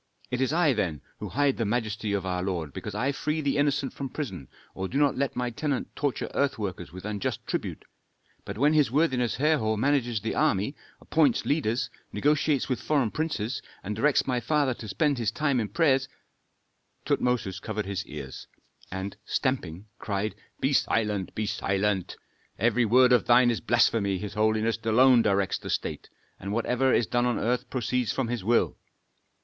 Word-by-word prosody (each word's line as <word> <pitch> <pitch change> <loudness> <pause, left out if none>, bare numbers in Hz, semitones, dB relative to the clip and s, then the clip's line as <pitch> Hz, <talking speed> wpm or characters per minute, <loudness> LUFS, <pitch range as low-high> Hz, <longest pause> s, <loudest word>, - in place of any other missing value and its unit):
"It 125 +1 -1
is 130 0 +1
I, 160 -3 +3
then, 85 - -2 0.2
who - - -5
hide 145 -1 +1
the 115 - 0
majesty 110 -1 -1
of 100 -2 -1
our 90 -1 -1
lord, 85 -6 -3
because 105 - -6
I 130 +6 +1
free 150 +3 -2
the 140 -2 0
innocent 145 -1 +1
from 135 -1 -5
prison, 100 - -5 0.3
or 95 0 -3
do 130 - -3
not 145 -1 +3
let 140 0 -1
my 125 -1 -1
tenant 140 +2 -3
torture 145 -3 -1
earth 140 -2 +1
workers 90 -7 -5
with 95 +2 -9
unjust 105 -2 -3
tribute. - - -4 0.6
But 100 - -7
when 145 +5 +4
his 150 -6 +4
worthiness 130 -4 +1
Herhor 135 -7 +2
manages 120 -2 +1
the 110 +2 -3
army, 105 +9 +1 0.2
appoints 155 -3 +2
leaders, 130 -5 0 0.2
negotiates 150 -1 +1
with 130 - -2
foreign 140 -8 +1
princes, 145 -7 -2 0.2
and 105 +2 -3
directs 140 +6 +3
my 125 -2 0
father 140 +2 +1
to 115 - -9
spend 145 +5 +1
his 115 -3 +1
time 140 +1 0
in 110 -3 -2
prayers 135 - +2 0.5
" - - -46
Tutmosis 110 -6 0
covered 110 -1 -3
his 100 -1 -3
ears, 70 -3 -8 0.4
and, 95 +1 -4
stamping, 105 - -2
cried, 105 +1 -2 0.3
"Be - - +1
silent! 105 -4 0
be 110 - -1
silent! 100 -1 -1 0.4
every 120 +1 +2
word 125 +3 +5
of 125 - +3
thine 120 0 +6
is 115 - -2
blasphemy. 110 -4 +2
His 105 +2 -6
holiness 110 +2 +1
alone 125 +2 +5
directs 100 -2 +1
the - - -8
state, - - -3 0.3
and 100 - -5
whatever 125 +4 +1
is 120 - +3
done 120 +2 +1
on 120 - 0
earth 125 +2 -1
proceeds 125 -1 -1
from 130 -3 -2
his 120 -5 -2
will. 115 +4 +2
120 Hz, 180 wpm, -27 LUFS, 105-135 Hz, 0.6 s, thine